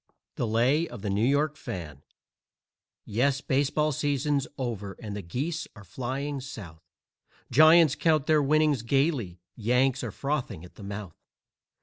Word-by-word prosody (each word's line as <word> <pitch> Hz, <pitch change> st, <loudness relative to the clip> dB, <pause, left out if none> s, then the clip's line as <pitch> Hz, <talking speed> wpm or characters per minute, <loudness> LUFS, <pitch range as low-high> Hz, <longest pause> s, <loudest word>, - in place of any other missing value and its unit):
THE 120 Hz, -, -1 dB
LAY 125 Hz, +9 st, +2 dB
OF 120 Hz, -4 st, -10 dB
THE 100 Hz, -, -1 dB
NEW 100 Hz, +3 st, +1 dB
YORK 145 Hz, +2 st, +2 dB
FAN 85 Hz, -, -7 dB, 1.0 s
Yes, 130 Hz, +6 st, +1 dB
the 140 Hz, -, -10 dB
baseball 145 Hz, +3 st, +1 dB
season's 145 Hz, 0 st, 0 dB
over 105 Hz, -6 st, -4 dB
and 105 Hz, -3 st, -6 dB
the 105 Hz, -, -4 dB
geese 140 Hz, -, -3 dB
are 105 Hz, -, -12 dB
flying 130 Hz, +8 st, -4 dB
South; 100 Hz, -, -9 dB, 0.7 s
Giants 155 Hz, +2 st, +7 dB
count 155 Hz, -3 st, +2 dB
their 155 Hz, -1 st, +4 dB
winnings 150 Hz, -2 st, +2 dB
gaily, 120 Hz, -, 0 dB
Yanks 125 Hz, +3 st, +1 dB
are 120 Hz, -, -3 dB
frothing 135 Hz, -, -3 dB
at 90 Hz, -, -15 dB
the -, -, -14 dB
mouth. 100 Hz, -3 st, -7 dB
130 Hz, 145 wpm, -27 LUFS, 105-145 Hz, 1.0 s, Giants